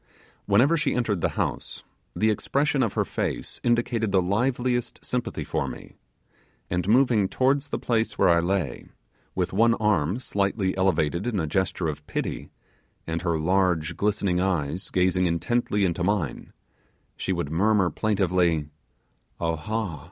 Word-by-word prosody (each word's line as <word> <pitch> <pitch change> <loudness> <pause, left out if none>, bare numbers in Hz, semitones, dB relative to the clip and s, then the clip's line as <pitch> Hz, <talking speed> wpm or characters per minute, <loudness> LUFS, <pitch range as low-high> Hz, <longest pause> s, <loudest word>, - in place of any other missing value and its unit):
Whenever 120 +11 +4
she 150 -2 0
entered 110 -7 0
the - - -1
house, - - -3 0.3
the 110 +1 +2
expression 140 +6 0
of 115 -6 0
her - - 0
face - - -3
indicated 120 -2 +1
the 95 - +4
liveliest 120 +6 -1
sympathy 125 -1 -2
for - - -2
me; - - -9 0.8
and 90 +1 -1
moving 115 -4 +4
towards 135 +2 +1
the - - -2
place 115 -2 -1
where - - +4
I 85 -1 +5
lay, 85 -7 -2 0.5
with 90 -1 -1
one 115 +3 +4
arm 100 -4 +1
slightly 100 -5 -1
elevated 90 0 +1
in 110 -5 0
a 80 - 0
gesture 95 +1 -1
of 75 -1 -4
pity, - - -4 0.6
and 80 0 -3
her 85 -2 0
large 90 -1 +1
glistening 100 -3 0
eyes 85 -3 -1
gazing 90 0 +2
intently 100 +4 0
into 85 -1 -1
mine, 90 -9 -1 0.6
she - - -3
would 85 -5 -2
murmur 95 +1 +2
plaintively, 90 -6 +1 0.7
'Awha! 85 +2 -2
95 Hz, 145 wpm, -25 LUFS, 85-115 Hz, 0.8 s, I